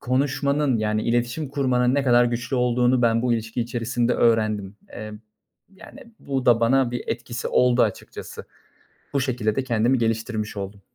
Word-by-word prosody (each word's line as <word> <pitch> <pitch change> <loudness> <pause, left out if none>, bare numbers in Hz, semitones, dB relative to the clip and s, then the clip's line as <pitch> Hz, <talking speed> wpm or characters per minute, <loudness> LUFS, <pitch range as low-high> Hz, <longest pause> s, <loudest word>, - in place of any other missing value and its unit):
konuşmanın, 140 +1 0
yani 110 0 -1
iletişim 120 +5 -1
kurmanın 130 -2 +1
ne 140 - +2
kadar 120 -2 +4
güçlü 120 +2 -2
olduğunu 125 0 +2
ben 115 0 +2
bu 125 -1 +1
ilişki 115 +1 -2
içerisinde 120 0 -1
öğrendim. 110 -4 +1
Eee, 110 0 -8 0.6
yani, - - -13 0.2
bu 135 -3 -3
da 120 -1 +5
bana 125 +1 +3
bir 120 - -4
etkisi 120 +1 -4
oldu 125 0 +3
açıkçası. - - -5 0.7
Bu 140 - +2
şekilde 120 -5 -1
de 135 - -1
kendimi 120 +1 +1
geliştirmiş 110 -2 -2
oldum. 100 0 -6
120 Hz, 155 wpm, -23 LUFS, 115-130 Hz, 0.7 s, da